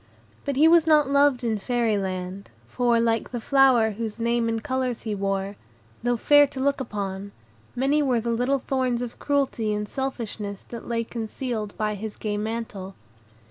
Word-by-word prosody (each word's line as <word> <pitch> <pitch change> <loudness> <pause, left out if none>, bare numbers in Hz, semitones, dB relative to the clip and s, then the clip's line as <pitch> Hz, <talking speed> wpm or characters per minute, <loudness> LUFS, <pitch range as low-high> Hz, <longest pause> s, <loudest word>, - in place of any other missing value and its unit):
But 280 - -1
he 300 +4 +6
was 330 -1 +5
not 300 -3 +4
loved 280 -3 +4
in 220 -3 0
Fairy 235 0 +1
Land, 190 0 -4 0.2
for, 240 -2 +2
like 230 -1 +1
the 240 - -4
flower 255 -3 +4
whose 220 +1 -5
name 235 0 +1
and 225 -1 -2
colors 260 -2 -2
he 220 - -2
wore, 195 0 -2 0.4
though 245 0 +1
fair 290 +4 +6
to 270 - -8
look 280 +1 +1
upon, 200 -4 -5 0.4
many 275 +4 +2
were 255 -5 +2
the 235 +1 -2
little 250 +4 +1
thorns 255 -2 -1
of 240 - -7
cruelty 275 -6 0
and 210 0 -3
selfishness 220 -6 -4
that 235 - -8
lay 230 -1 0
concealed 225 -1 -4
by 215 0 0
his 210 +1 -6
gay 210 -1 -2
mantle. 210 -3 -4
235 Hz, 175 wpm, -25 LUFS, 210-260 Hz, 0.4 s, he